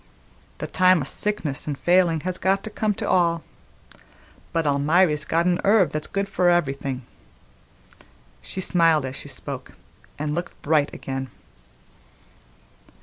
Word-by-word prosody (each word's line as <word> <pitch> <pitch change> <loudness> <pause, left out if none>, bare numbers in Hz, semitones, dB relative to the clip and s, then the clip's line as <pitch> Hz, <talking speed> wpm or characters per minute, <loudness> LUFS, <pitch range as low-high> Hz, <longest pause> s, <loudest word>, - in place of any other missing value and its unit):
"The - - -4
time 185 -2 +4
o' - - -2
sickness 155 -2 -3
an' 145 - -1
failin' 175 0 +3
has 185 +2 -3
got 195 +1 +1
to 220 - -6
come 210 -1 -1
to - - -3
all. 170 -2 +2 1.1
But 165 -1 0
Almiry's 150 +2 +2
got 170 +1 +1
an 180 -1 +1
herb 200 -3 +4
that's 155 0 -3
good 200 0 -2
for 180 -2 +2
everything." 140 -6 0 1.4
She 190 - -5
smiled 165 -5 +3
as 130 0 -5
she - - -9
spoke, - - -6 0.4
and 150 0 -2
looked 175 +2 -5
bright 150 -1 +2
again. 135 -1 -5
165 Hz, 140 wpm, -24 LUFS, 145-185 Hz, 1.4 s, time